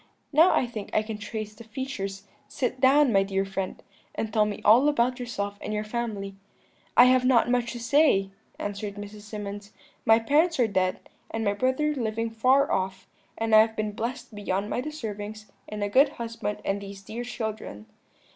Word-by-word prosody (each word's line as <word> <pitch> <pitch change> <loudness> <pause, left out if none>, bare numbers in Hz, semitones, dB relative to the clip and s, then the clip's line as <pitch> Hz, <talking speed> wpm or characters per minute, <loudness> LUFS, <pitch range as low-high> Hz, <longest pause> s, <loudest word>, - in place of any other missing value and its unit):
Now 325 +5 +6
I - - +2
think 220 -4 -7
I 215 - +3
can 215 -1 -6
trace 215 0 -5
the 215 - -12
features; 215 -5 -5 0.2
sit 255 0 -2
down, 270 -1 +5
my 195 - +5
dear 195 0 -1
friend, 195 -1 -4 0.3
and 220 -1 -3
tell 215 -1 +4
me 205 - -4
all 245 +8 +7
about 250 -2 +1
yourself 205 -4 -4
and 210 - -3
your 210 - -1
family.' 215 -3 -4 0.6
"'I 245 - +10
have 255 0 +4
not 245 -2 +4
much 245 -1 0
to 240 - -6
say,' 235 -6 +3 0.3
answered 205 0 -4
Mrs. 205 0 -9
Symonds; 205 -1 -7 0.3
'my 225 -1 +6
parents 295 +8 +2
are 245 - +5
dead, 185 -3 0 0.3
and 225 0 -3
my 200 - +2
brother 260 +7 +1
living 230 -3 -2
far 260 +5 +3
off: 190 0 -2 0.3
and 225 0 -1
I 215 - +9
have 220 0 0
been 215 -1 -2
blessed 235 +2 -5
beyond 205 0 -2
my 245 - 0
deservings 215 -7 -6 0.2
in 210 -1 -4
a - - +1
good 270 +8 +5
husband 230 -3 -4
and 200 +1 -1
these 200 0 -9
dear 230 +5 -6
children.' 220 - -5
220 Hz, 185 wpm, -26 LUFS, 205-245 Hz, 0.6 s, I